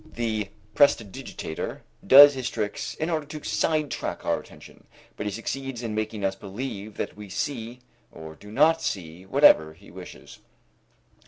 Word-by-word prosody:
The 110 -4 -2 0.2
prestidigitator 105 - 0 0.3
does 145 +2 +10
his 130 -2 -3
tricks 105 -2 -4
in 160 +2 -2
order 155 -3 -2
to 150 0 -8
sidetrack 155 -3 -1
our - - +1
attention, - - -16 0.3
but 105 - -4
he - - -2
succeeds 125 +3 -5
in 115 -2 -3
making 110 -1 -3
us 95 - +1
believe 100 +1 -7
that - - -4
we 105 -1 -10
see 120 +2 -4 0.3
or 80 -1 -10
do 105 +6 -14
not 155 +7 +4
see 90 0 -5
whatever 95 - +5
he 100 +4 -17
wishes. 90 +1 -12
110 Hz, 150 wpm, -25 LUFS, 100-135 Hz, 0.3 s, does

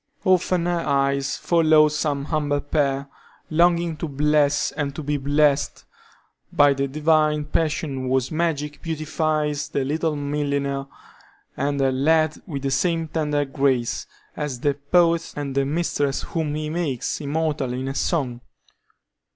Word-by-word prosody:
Often 185 -1 +2
her 175 -1 0
eyes 140 -2 0
followed 155 -2 +4
some 150 -2 -1
humble 145 -2 0
pair, 140 -1 -1 0.4
longing 170 0 +3
to 165 - -3
bless 145 0 +2
and 140 -2 -3
to 155 - -5
be 145 +1 -1
blessed 145 +1 +1 0.7
by 145 -1 +5
the 140 0 -1
divine 155 +1 +2
passion 150 -4 -1
whose 130 0 +1
magic 150 -3 -2
beautifies 155 -2 -1
the 135 - -1
little 155 +2 -1
milliner 140 -1 -2 0.7
and 140 0 -1
her 135 -1 +2
lad 155 +3 +2
with 140 -5 -5
the 135 - -1
same 165 +3 0
tender 150 -2 0
grace 135 -3 0 0.3
as 140 -5 -4
the 145 - +2
poet 165 +4 +2
and 145 -2 -4
the 140 0 +1
mistress 145 -2 -1
whom 155 -3 -2
he 155 0 -3
makes 155 -5 -2
immortal 145 -3 -1
in 130 +2 -3
a 135 - -2
song. 135 -5 -1
145 Hz, 140 wpm, -23 LUFS, 140-155 Hz, 0.7 s, by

